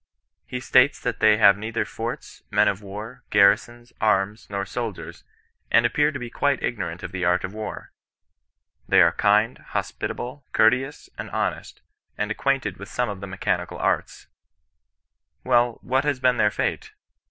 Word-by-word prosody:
He 125 - -4
states 130 +2 +4
that - - -3
they 110 -1 +5
have 100 -2 +7
neither 110 +2 -2
forts, 115 +1 -6
men - - +3
of 100 +1 0
war, 105 +6 -8
garrisons, 120 +4 +3
arms, 105 0 +1
nor 100 -1 -3
soldiers, 115 -5 -6 0.5
and 115 +1 +4
appear 150 +5 +2
to 140 - -5
be 120 -3 -7
quite 140 -2 0
ignorant 90 -6 -3
of 95 - -6
the 90 -1 -4
art 90 +1 +2
of 95 - -5
war. 110 0 -7 1.0
They - - +5
are - - +4
kind, 105 +3 +2
hospitable, 130 +3 -5
courteous, 130 +6 +2
and - - -5
honest, - - -3 0.3
and 105 0 -2
ac - - -3
quainted 135 -8 0
with 100 - -10
some 125 -2 -1
of 100 -2 -6
the 100 - -6
mechanical 95 0 -2
arts. - - -1 1.2
WeU, 120 -2 +3
what 130 +2 +1
has 145 -3 0
been 125 -1 +2
their 105 - +4
fate? - - -3
110 Hz, 165 wpm, -24 LUFS, 100-125 Hz, 1.2 s, have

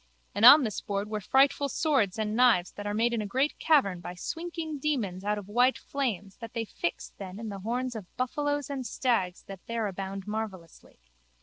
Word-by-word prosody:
And 205 +3 +3
on 285 +4 +11
this 215 -5 -3
board 200 +1 -3
were 215 -1 -2
frightful 275 +5 +3
swords 260 - +1
and 215 -1 -1
knives 230 -8 +4
that 205 0 -7
are 205 - -1
made 235 +2 +2
in 230 - 0
a 210 - -4
great 265 +8 0
cavern 235 - +3
by 175 +1 -7
swinking 325 - -5
demons 225 -11 -1
out 210 +1 0
of 200 -2 -7
white 245 +5 +3
flames 210 -9 -3
that 230 -1 -9
they 230 -1 -2
fix 170 -4 -4
then 190 -1 -7
in 225 -1 -5
the 200 -1 -6
horns 245 +4 -2
of 205 -5 -9
buffalos 290 +2 -1
and 275 -2 -4
stags 230 -8 -1
that 195 -2 -10
there 230 -1 -1
abound 195 0 -5
marvellously. 210 -6 -6
220 Hz, 200 wpm, -28 LUFS, 195-260 Hz, -, on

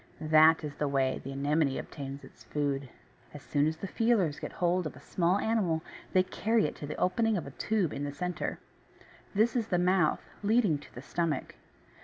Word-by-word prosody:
That 155 0 +5
is 150 -1 -4
the 150 - -1
way 135 -2 +1
the 135 - -6
Anemone 140 +1 +1
obtains 140 -1 -7
its - - -15
food. 140 -2 -2 0.5
As 145 - -9
soon 145 0 +1
as 160 0 -2
the 195 - -5
feelers 205 -9 +1
get - - -6
hold 175 -1 +1
of - - -9
a - - -12
small 180 +1 +1
animal 200 -8 +1 0.3
they 185 -1 +4
carry 220 +4 +1
it - - -2
to 145 - -6
the 150 - -4
opening 220 +4 +2
of 170 - -4
a 140 - -8
tube 200 +2 0
in 140 - -4
the 145 - -2
centre. 180 +5 -3 0.8
This 220 +4 +3
is 230 -3 0
the 180 - +1
mouth, 180 -2 +2 0.2
leading 210 -7 +3
to - - -16
the 125 - -8
stomach. 160 -3 -2
160 Hz, 200 wpm, -30 LUFS, 145-195 Hz, 0.8 s, That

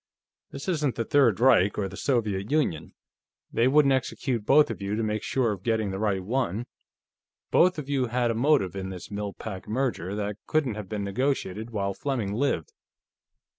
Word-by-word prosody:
This 140 +4 -8
isn't 150 -8 0
the 115 - -2
Third 130 -8 +3
Reich 105 -6 +4
or 100 - 0
the 95 - -9
Soviet 105 -5 -1
Union; 140 - -1 0.6
they 115 - +3
wouldn't 140 0 +5
execute 125 -3 -2
both 150 +2 +5
of - - -7
you 100 +1 -2
to 115 - -1
make 110 0 -1
sure 125 -4 0
of 100 -3 -5
getting 110 -1 0
the 95 - -4
right 100 -3 0
one. 115 0 -1 0.9
Both 180 0 +4
of 150 -3 -5
you 135 -3 0
had 120 0 +1
a - - 0
motive 120 - +2
in 95 -1 -4
this 95 +2 -8
Mill 100 -1 -4
Pack 95 -4 -7
merger 110 -5 -1
that 105 -1 -3
couldn't 150 -7 +1
have 105 -3 -7
been 105 -2 -3
negotiated 110 -1 -1
while 100 -3 -2
Fleming 120 -5 -2
lived. 115 - -1
110 Hz, 185 wpm, -27 LUFS, 100-135 Hz, 0.9 s, wouldn't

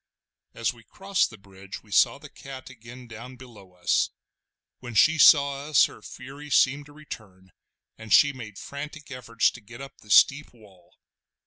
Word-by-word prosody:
As 115 +1 -1
we 115 -1 -18
crossed 195 - -1
the 110 - -13
bridge 100 0 -12
we - - -21
saw - - +3
the - - -12
cat 135 -1 -11
again 125 +1 -13
down 120 +3 -11
below 110 -7 -15
us. 90 -1 0 0.7
When 120 -2 -9
she 160 +5 +4
saw 140 -1 +5
us 155 -2 +5
her - - -10
fury 140 +3 -11
seemed 140 +1 +2
to - - -16
return, 105 -11 -12 0.5
and 110 -1 -11
she 145 +6 +6
made 110 -6 -10
frantic 145 +1 -9
efforts 115 -3 0
to 120 - -13
get 115 +3 -13
up 135 0 -11
the 105 - -19
steep 140 +6 +4
wall. 95 -6 -21
125 Hz, 175 wpm, -25 LUFS, 110-140 Hz, 0.7 s, she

